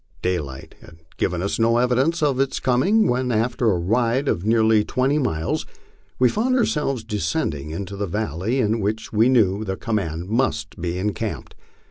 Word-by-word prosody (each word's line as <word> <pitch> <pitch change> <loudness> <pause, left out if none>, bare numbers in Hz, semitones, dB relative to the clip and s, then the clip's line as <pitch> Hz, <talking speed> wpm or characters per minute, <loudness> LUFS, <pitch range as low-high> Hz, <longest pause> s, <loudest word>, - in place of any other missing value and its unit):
Daylight 75 -8 -3
had 80 0 -15 0.2
given 90 -1 -1
us 100 - -2
no 115 +1 +3
evidence 130 +7 +1
of 140 -3 +1
its 135 0 0
coming, 185 - +3
when, 125 +1 0
after 115 +1 +1
a 95 - +2
ride 115 +9 +1
of 85 - 0
near 110 +1 +3
ly 110 -1 +4
twenty 130 +7 0
miles, 80 - -1 0.5
we 125 - +4
found 240 - +1
ourselves 150 - 0
descending 80 -8 -2
into 100 +5 -5
a 100 0 -2
valley 105 +4 -2
in 110 -1 +1
which 110 +2 -3
we 110 +3 +4
knev 110 -4 +2
the 95 0 -2
command 90 -7 -2
must 95 - -1
be 85 0 -2
encamped. 100 +2 -3
110 Hz, 170 wpm, -22 LUFS, 95-125 Hz, 0.5 s, ly